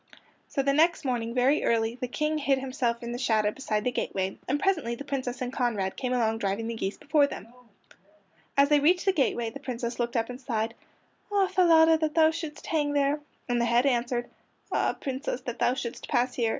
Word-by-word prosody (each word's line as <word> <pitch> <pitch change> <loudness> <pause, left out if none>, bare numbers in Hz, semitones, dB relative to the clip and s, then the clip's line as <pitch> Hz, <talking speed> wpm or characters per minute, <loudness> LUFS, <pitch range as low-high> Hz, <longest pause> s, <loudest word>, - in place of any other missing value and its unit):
So 275 - -1
the 275 0 +2
next 320 +1 +3
morning 235 -2 -1
very 260 +4 +3
early 225 0 +1
the 250 +1 -5
King 305 +4 -1
hid 275 -2 +2
himself 255 -3 -2
in 235 - -4
the 240 - -4
shadow 215 -4 +2
beside 215 -4 -2
the 250 - 0
gateway, 190 -5 -2
and 285 +3 0
presently 315 -12 0
the 280 - -8
Princess 260 -3 -3
and 250 +1 -4
Conrad 225 -8 -1
came 250 -1 -3
along 225 -3 +1
driving 200 +2 -1
the 230 - -3
geese 200 -3 -3
before 295 -1 +3
them. 225 - -8 1.1
As 280 +1 +5
they 295 -1 +5
reached 350 +6 +3
the 385 - +3
gateway 240 -7 0
the 275 - -8
Princess 245 -3 -4
looked 240 0 -1
up 225 0 0
and 250 +2 -9
sighed: 225 -2 -2 0.6
"Ah, 400 -1 +3
Falada, 325 -3 +5
that 310 -1 -1
thou 320 -1 +5
shouldst 315 -2 -6
hang 295 -3 0
there!" 285 +1 +2 0.3
And 240 -1 +1
the - - +2
head 235 +2 +3
answered: 240 -2 0 0.4
"Ah, - - +1
Princess, 265 -1 -3
that 240 -2 -6
thou 250 - +2
shouldst 240 -2 -5
pass 245 +1 +1
here! 230 -2 0
255 Hz, 210 wpm, -27 LUFS, 235-290 Hz, 1.1 s, As